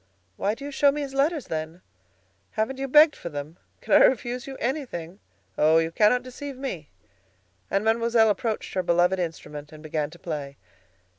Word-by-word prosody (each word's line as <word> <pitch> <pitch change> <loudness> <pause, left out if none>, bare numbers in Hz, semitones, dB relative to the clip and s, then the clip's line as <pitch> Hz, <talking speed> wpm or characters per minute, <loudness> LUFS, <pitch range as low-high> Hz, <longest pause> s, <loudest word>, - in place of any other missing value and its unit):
"Why 205 - -1
do 275 - -9
you 290 - -5
show 285 0 +4
me 295 +1 -3
his 275 -2 -5
letters, 285 +1 +1
then?" 160 +2 -5 0.7
"Haven't 220 +5 -2
you 270 - -2
begged 300 +3 +6
for 170 - -7
them? 150 +2 -7 0.2
Can - - -2
I - - +8
refuse 245 0 +1
you 270 -1 -7
anything? 230 - -4 0.4
Oh! 155 +2 +5
you 165 0 +1
cannot 215 +7 +3
deceive 260 +2 -8
me," 255 - -5 0.8
and 200 +2 0
Mademoiselle 225 0 +3
approached 225 0 -3
her 185 - +1
beloved 175 +1 +2
instrument 150 -3 -5
and 155 0 -12
began 155 -1 -2
to 175 - -14
play. 145 -5 -6
215 Hz, 175 wpm, -25 LUFS, 165-265 Hz, 0.8 s, I